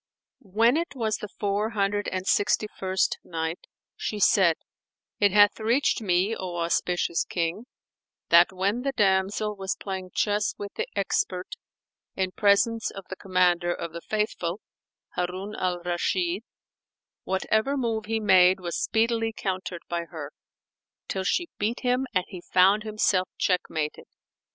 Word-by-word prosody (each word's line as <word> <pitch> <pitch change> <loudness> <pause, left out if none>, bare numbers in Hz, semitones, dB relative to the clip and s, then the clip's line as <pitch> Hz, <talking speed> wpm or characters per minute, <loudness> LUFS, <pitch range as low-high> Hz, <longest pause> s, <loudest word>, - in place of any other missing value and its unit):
When 230 +6 +5
it 335 -3 -3
was 220 -4 -1
the 210 - -6
Four 205 +1 -1
Hundred 205 -1 0
and 185 0 -3
Sixty 210 +2 +2
first 190 0 0
Night, 160 +1 -4 0.3
She 210 - -4
said, 185 -4 +5 0.6
It 205 -1 +4
hath 205 +1 +5
reached 235 +3 +2
me, 190 +2 +1
O 180 -4 -5
auspicious 170 0 0
King, 175 +7 -3 0.6
that 170 +2 +7
when 195 +5 -1
the 275 +1 -2
damsel 205 0 +1
was 190 -1 -3
playing 190 -2 -5
chess 210 0 +1
with 200 0 -7
the - - -3
expert 185 -2 -1 0.7
in 190 -1 -1
presence 210 +3 +2
of 195 -1 -9
the - - -3
Commander 180 -2 +2
of 170 -1 -6
the 170 - -6
Faithful, 210 -4 -2 0.5
Harun 185 +3 -4
al 180 -1 -2
Rashid, 175 +1 0 0.8
whatever 220 +8 0
move 225 -4 -1
he 225 0 0
made 185 -3 +5
was 175 -2 -3
speedily 225 0 +1
countered 185 -4 -4
by 170 0 -2
her, 155 -4 -8 0.8
till 190 - -2
she 345 - 0
beat 220 +4 -1
him 250 +1 +1
and 185 0 +2
he 185 -3 -9
found 190 +4 +4
himself 210 -3 +1
checkmated. 160 -5 -1
195 Hz, 140 wpm, -26 LUFS, 180-215 Hz, 0.8 s, that